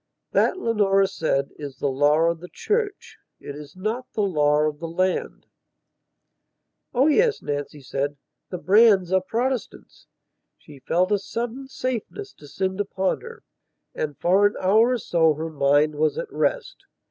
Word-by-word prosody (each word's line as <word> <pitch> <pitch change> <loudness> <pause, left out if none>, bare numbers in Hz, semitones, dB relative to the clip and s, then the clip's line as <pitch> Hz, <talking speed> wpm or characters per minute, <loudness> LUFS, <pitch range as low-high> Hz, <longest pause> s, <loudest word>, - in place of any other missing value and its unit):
"That," - - +2
Leonora 205 - +2
said, 160 -7 -1
"is 140 -3 -7
the - - -5
law 145 +3 +3
of 165 0 +1
the 180 - -10
church. 425 -2 -3 0.2
It 140 - -8
is 150 +1 -11
not 220 +7 -4
the 210 - 0
law 150 -5 +2
of 150 -1 -1
the 165 - -5
land...." 185 +3 -2 1.5
"Oh 255 +2 +3
yes," 430 +9 +3
Nancy 145 0 -4
said, 140 +2 -3 0.3
"the 180 - -4
Brands 190 +1 +4
are 190 0 +3
Protestants." 245 +6 -4 0.5
She 145 -3 -15
felt 180 +8 0
a 205 - +3
sudden 240 +6 -5
safeness 255 - -5
descend 190 +6 -3
upon 190 -1 -1
her, 465 0 -11 0.5
and 150 -2 -4
for 190 +4 +4
an 205 - -5
hour 220 +6 +4
or - - +1
so 165 -7 +2
her 160 +2 -5
mind 145 +1 +2
was 155 +1 0
at - - -5
rest. - - -1
185 Hz, 155 wpm, -24 LUFS, 150-230 Hz, 1.5 s, Brands